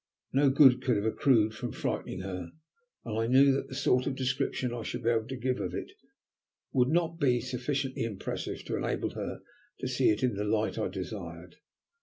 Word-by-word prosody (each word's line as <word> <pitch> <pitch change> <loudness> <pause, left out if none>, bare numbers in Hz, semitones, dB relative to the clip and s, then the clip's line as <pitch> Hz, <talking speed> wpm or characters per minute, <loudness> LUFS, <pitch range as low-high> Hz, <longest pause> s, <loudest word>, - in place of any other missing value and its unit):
No 140 +1 +5
good 130 -2 +6
could 130 -3 +2
have 100 +1 -1
accrued 110 -1 +3
from 120 0 -5
frightening 90 - -3
her, 90 -2 -5 0.6
and 110 -1 -2
I 115 - +1
knew 135 +3 +6
that 135 - -1
the 130 - -8
sort 130 -1 +2
of 135 - -1
description 130 -1 -1
I 120 - -4
should 120 +2 -5
be 115 - +3
able 110 -1 0
to 130 - -4
give 125 +1 -1
of - - -3
it - - -5 0.8
would 125 -1 +3
not 165 +1 +1
be 125 -5 +3
sufficiently 130 +2 -2
impressive 110 -4 -4
to - - -2
enable - - -1
her - - -5 0.4
to - - -3
see - - +2
it 105 +3 +1
in 125 -3 +2
the 100 +1 -2
light 110 +1 0
I - - 0
desired. - - -7
125 Hz, 200 wpm, -30 LUFS, 110-135 Hz, 0.8 s, good